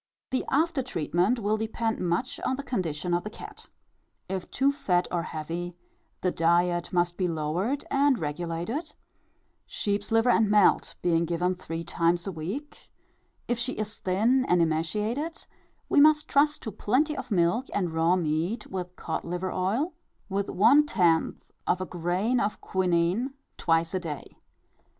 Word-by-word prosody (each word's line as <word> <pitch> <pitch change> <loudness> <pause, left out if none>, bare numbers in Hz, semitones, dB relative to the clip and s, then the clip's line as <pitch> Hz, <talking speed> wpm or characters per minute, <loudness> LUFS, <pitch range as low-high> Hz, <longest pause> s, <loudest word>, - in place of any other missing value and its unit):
The 260 - 0
after 315 +1 +2
treatment 180 - 0
will 215 -1 0
depend 225 +1 -2
much 180 +8 -1
on 260 - -1
the 280 - -6
condition 175 - -2
of 175 - +1
the 210 - -5
cat. 215 - -11 0.6
If 190 -1 -4
too 275 +2 +2
fat 180 -10 0
or 175 - 0
heavy, 170 +2 -5 0.5
the 180 - +1
diet 175 +1 +2
must 175 -1 +1
be 185 - +1
lowered 170 - -1
and 280 -1 +3
regulated, 170 - -4 0.7
sheep's 205 0 -2
liver 225 +2 +4
and 220 -3 +3
melt 210 -2 +4
being 170 -1 +2
given 175 +2 0
three 165 -2 -6
times 170 +1 +1
a 195 - -3
week; 190 - -6 0.6
if 240 -1 0
she 250 +2 -1
is 215 0 -5
thin 225 +8 +2
and 180 - +4
emaciated, 210 - -1 0.4
we 290 - +5
must 305 0 +5
trust 295 +1 +2
to 220 - -4
plenty 260 +10 +1
of - - -6
milk 200 +6 +2
and 180 -5 -1
raw 165 +2 +3
meat, 175 +6 -1
with 180 -1 -5
cod 160 - -4
liver 180 +2 -3
oil, 230 - 0 0.4
with 200 +1 -1
one 230 +10 +6
tenth 170 - +1 0.2
of 180 - +2
a 185 - -2
grain 180 +8 0
of 205 +1 -1
quinine, 185 +8 0 0.2
twice 165 +1 +1
a 185 - +1
day. 155 -5 -7
185 Hz, 155 wpm, -27 LUFS, 170-240 Hz, 0.7 s, one